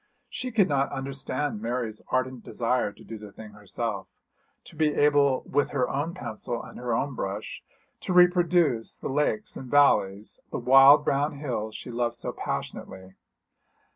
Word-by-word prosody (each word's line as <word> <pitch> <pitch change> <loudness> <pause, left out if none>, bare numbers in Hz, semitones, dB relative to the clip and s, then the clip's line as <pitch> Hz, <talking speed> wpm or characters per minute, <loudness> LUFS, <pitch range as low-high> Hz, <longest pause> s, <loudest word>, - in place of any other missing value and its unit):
She 255 0 -4
could 210 -5 +3
not 140 -2 0
understand 135 -2 -3
Mary's 115 -2 -3
ardent 130 -1 -1
desire 120 -2 -1
to - - -17
do 110 0 -8
the 105 -1 -11
thing 110 +1 -11
herself, 105 -1 -4 0.6
to - - -13
be 155 -1 +1
able 145 -2 +3
with 145 +1 0
her 130 -3 0
own 150 +6 -3
pencil 120 -6 -5
and 115 - -11
her 125 0 -3
own 135 +5 0
brush 100 -2 -5 0.4
to - - -4
reproduce 175 -8 +3
the - - -5
lakes 150 +10 -1
and 130 - -8
valleys, 105 -8 +2
the - - -4
wild 135 +4 +7
brown 145 +2 +1
hills 120 -7 -4
she 125 - -7
loved 120 0 -1
so - - -3
passionately. 95 0 -6
130 Hz, 160 wpm, -26 LUFS, 115-145 Hz, 0.6 s, wild